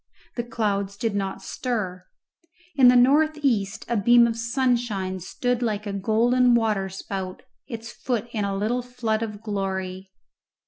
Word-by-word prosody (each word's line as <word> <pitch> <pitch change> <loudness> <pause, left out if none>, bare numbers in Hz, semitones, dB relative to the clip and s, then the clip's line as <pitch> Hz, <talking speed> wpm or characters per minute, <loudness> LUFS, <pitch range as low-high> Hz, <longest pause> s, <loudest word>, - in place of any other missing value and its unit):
The 240 - -2
clouds 200 -4 -2
did 225 -1 -1
not 195 -1 -3
stir. 190 -8 -3 0.7
In 260 -3 +7
the 250 - +7
north 300 +5 +4
east 225 -5 0
a 235 - 0
beam 235 +3 +6
of 230 -1 0
sunshine 235 -6 -1
stood 245 +7 -2
like 215 -3 -1
a 200 - -4
golden 235 +5 +3
waterspout, 195 -3 -2 0.2
its 230 -2 -7
foot 240 -3 -3
in 215 -3 -2
a 200 -1 -1
little 225 +5 0
flood 235 -3 -2
of 215 -2 -5
glory. 190 -2 -3
220 Hz, 145 wpm, -24 LUFS, 195-240 Hz, 0.7 s, In